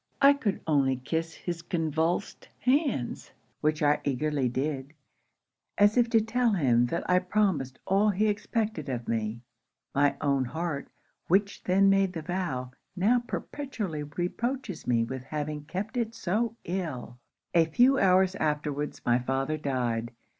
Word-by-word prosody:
I 280 +1 +7
could 220 -8 -2
only 140 -4 +3
kiss 160 +6 -3
his 170 -2 -5
convulsed 165 +2 -1
hands; 255 - 0 0.3
which 155 0 0
I 145 0 +3
eagerly 140 -1 0
did, 135 +2 -3 0.8
as 205 +1 +5
if 240 -2 +3
to 230 -1 +5
tell 230 +1 +1
him 125 -9 +3
that 170 - -3
I 180 0 +4
promised 180 -9 0
all 200 +3 +3
he 205 +2 +1
expected 210 -6 -1
of 120 -2 -4
me. 115 0 -2 0.5
My 140 0 +3
own 140 -2 +1
heart, 160 +2 -3 0.4
which 200 +3 +2
then 195 +2 +4
made 195 -1 +3
the 165 -3 -5
vow, 150 -8 -3 0.2
now 215 +7 +3
perpetually 235 - -4
reproaches 180 - -3
me 120 -2 +3
with 130 +2 -5
having 150 +1 -4
kept 195 - -4
it 230 -1 -1
so 220 +5 -1
ill! 160 -9 -4 0.3
'A 165 -1 +5
few 250 - +4
hours 190 0 +4
afterwards, 150 -3 -2
my 120 0 +3
father 135 +4 -1
died. 125 -6 -1
165 Hz, 145 wpm, -28 LUFS, 140-200 Hz, 0.8 s, I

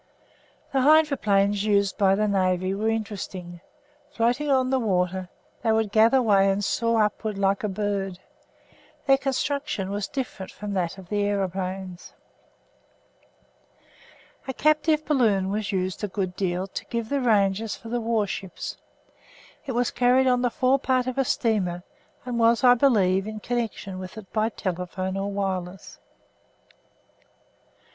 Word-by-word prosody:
The 270 - +2
hydroplanes 215 -10 +3
used 200 -2 +2
by 195 -1 +3
the 210 +1 +1
Navy 185 -1 +1
were 215 +3 -1
interesting. 190 -5 -5 0.5
Floating 250 +3 0
on 260 -1 +2
the 265 - +2
water, 185 -4 -1 0.3
they 225 - +1
would 220 -2 +1
gather 230 +4 +5
way 195 -3 +4
and 195 +1 0
soar 230 0 +2
upwards 210 0 -2
like 195 +1 +1
a - - +1
bird. 195 -2 -2 0.9
Their 270 -1 +4
construction 275 -6 -2
was 200 0 -2
different 250 -8 -5
from 205 0 -6
that 180 -1 -2
of 185 -2 -12
the 205 -1 0
aeroplanes. 190 -2 -3 2.3
A 265 - -4
captive 305 +1 +2
balloon 210 -10 +2
was 210 0 -2
used 185 +1 -2
a - - +1
good 185 -2 -3
deal 185 -1 -1
to 195 - -7
give 230 -2 -4
the 280 -1 0
ranges 210 -2 +2
for 225 - -11
the 240 0 -1
warships. 210 -4 -3 0.9
It 260 - -2
was 245 0 0
carried 250 +2 +3
on 250 -1 +3
the 245 - +2
forepart 255 0 +1
of 255 +1 -3
a - - +4
steamer 195 -8 0 0.4
and 245 -2 -2
was, 230 +2 +3
I 245 -1 +8
believe, 205 -7 +3
in 215 0 -6
connection 220 -5 -3
with 185 +3 -8
it 210 -3 -11
by 220 0 +1
telephone 185 -1 -4
or 195 +1 -2
wireless. 190 -2 -4
210 Hz, 145 wpm, -25 LUFS, 190-245 Hz, 2.3 s, I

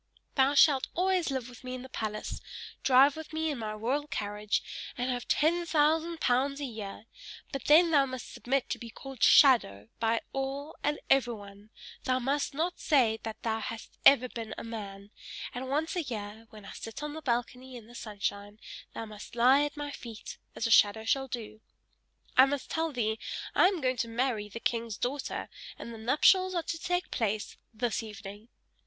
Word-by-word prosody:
Thou 275 +1 +3
shalt 275 -2 +5
always 365 -2 +2
live 260 -3 -2
with 245 0 -13
me 255 0 -5
in 255 - -7
the - - -8
palace, 215 -4 -4 0.4
drive 270 +2 +6
with 315 -1 -8
me 315 0 0
in 280 - -4
my 215 -1 -3
royal 255 +8 -1
carriage, 210 -4 -2 0.3
and 250 +1 -1
have 245 -1 -4
ten 340 +3 +2
thousand 320 +1 +2
pounds 275 +2 +1
a 290 - -2
year; 215 -4 -7 0.5
but 275 -3 -5
then 330 +3 +6
thou 280 -3 +4
must 255 -2 -7
submit 265 +1 -1
to - - -2
be 235 - -8
called 270 +3 -10
SHADOW 110 - +6
by 225 0 +1
all 275 +2 -3
and 295 0 0
everyone; 210 -6 0 0.4
thou 255 0 +2
must 275 +3 0
not 335 +4 -1
say 235 -7 +3
that 220 -1 -7
thou 225 -1 0
hast 225 +1 -7
ever 255 -2 +7
been 230 -2 -6
a - - -6
man; 205 -3 -7 0.4
and 260 +1 -5
once 310 +6 -1
a 355 - +1
year, 220 -4 -6
when 215 -2 -13
I - - -9
sit 225 +6 -7
on 300 0 -4
the 315 - -7
balcony 250 0 -2
in 235 -3 -10
the 235 - -15
sunshine, 205 -2 -4 0.4
thou 225 - -4
must 215 +1 -11
lie 255 +4 +6
at 295 0 -6
my 290 0 -4
feet, 230 -6 -9 0.2
as - - -2
a 230 - 0
shadow 215 +1 +5
shall 270 +4 +1
do! 220 -3 -6 0.7
I 260 +1 +8
must 280 -1 -3
tell 325 0 0
thee: 220 -4 -1 0.3
I - - +6
am 375 -4 -1
going 255 -1 +1
to 235 - -1
marry 230 -3 -1
the 230 - -7
king's 230 -2 -2
daughter, 265 +3 -3 0.3
and 235 - -8
the 225 - -9
nuptials 370 - +4
are 340 - 0
to 330 - -4
take 355 +2 -1
place 215 -3 -1 0.2
this 235 +1 -1
evening!" 210 0 -9
250 Hz, 190 wpm, -30 LUFS, 220-285 Hz, 0.7 s, I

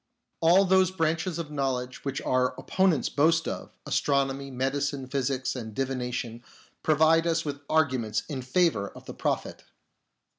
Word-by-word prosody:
All 175 +4 +5
those 190 -1 +4
branches 165 -1 -1
of 160 -3 -5
knowledge 130 -3 -2
which 135 -1 -3
our 130 0 +1
opponents 175 -1 +2
boast 165 +3 +2
of - - -5
— - - -48
astronomy, 140 -1 0
medicine, 135 +1 -2
physics, 130 0 -1
and 110 -4 -6
divination 125 -3 -3 0.2
— - - -30
provide 160 +2 +4
us 165 -1 +1
with 145 -1 -4
arguments 130 -8 +1
in 140 -4 -4
favour 130 - +1
of - - -14
the - - -7
Prophet. - - -2
140 Hz, 150 wpm, -27 LUFS, 130-165 Hz, 0.2 s, All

